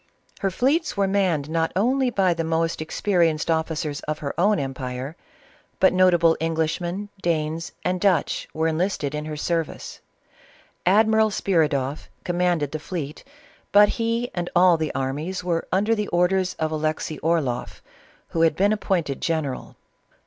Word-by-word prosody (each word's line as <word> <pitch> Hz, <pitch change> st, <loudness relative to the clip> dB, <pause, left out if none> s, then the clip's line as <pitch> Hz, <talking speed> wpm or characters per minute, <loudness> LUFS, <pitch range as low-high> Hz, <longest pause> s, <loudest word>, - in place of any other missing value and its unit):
Her 195 Hz, -, 0 dB
fleets 280 Hz, -, 0 dB
were 200 Hz, -1 st, +2 dB
manned 185 Hz, -7 st, +1 dB
not 165 Hz, +1 st, 0 dB
only 255 Hz, +6 st, +2 dB
by 190 Hz, -6 st, +2 dB
the 165 Hz, 0 st, -2 dB
most 165 Hz, 0 st, -1 dB
experienced 165 Hz, -1 st, +1 dB
officers 160 Hz, -2 st, -1 dB
of 155 Hz, 0 st, -1 dB
her 145 Hz, -3 st, -4 dB
own 205 Hz, +4 st, +3 dB
empire, 130 Hz, 0 st, -4 dB, 0.6 s
but 190 Hz, -, +5 dB
notable 175 Hz, -3 st, +4 dB
Englishmen, 165 Hz, +5 st, -2 dB
Danes, 160 Hz, -1 st, -1 dB
and 180 Hz, 0 st, 0 dB
Dutch, 185 Hz, -7 st, +1 dB
were 160 Hz, +1 st, 0 dB
enlisted 160 Hz, -3 st, -1 dB
in 150 Hz, 0 st, -3 dB
her 155 Hz, -1 st, -5 dB
service. 165 Hz, +1 st, -3 dB, 0.9 s
Admiral 220 Hz, +2 st, +4 dB
Spiridoff 150 Hz, -8 st, 0 dB
commanded 175 Hz, -5 st, 0 dB
the 155 Hz, -, -4 dB
fleet, 155 Hz, -3 st, -6 dB, 0.5 s
but 205 Hz, 0 st, +7 dB
he 230 Hz, +1 st, -1 dB
and 175 Hz, -1 st, -3 dB
all 180 Hz, 0 st, +6 dB
the 155 Hz, -2 st, -2 dB
armies 150 Hz, +8 st, -3 dB
were 170 Hz, -2 st, -1 dB
under 205 Hz, +4 st, +2 dB
the 210 Hz, -2 st, -1 dB
orders 180 Hz, +1 st, +1 dB
of 160 Hz, 0 st, -2 dB
Alexey 155 Hz, 0 st, -2 dB
Orloff, 150 Hz, -7 st, -1 dB, 0.5 s
who 165 Hz, -, -1 dB
had 165 Hz, -2 st, +4 dB
been 200 Hz, +4 st, +3 dB
ap 215 Hz, -, -4 dB
pointed 165 Hz, -8 st, -1 dB
general. 155 Hz, -5 st, -2 dB
170 Hz, 150 wpm, -23 LUFS, 155-190 Hz, 0.9 s, but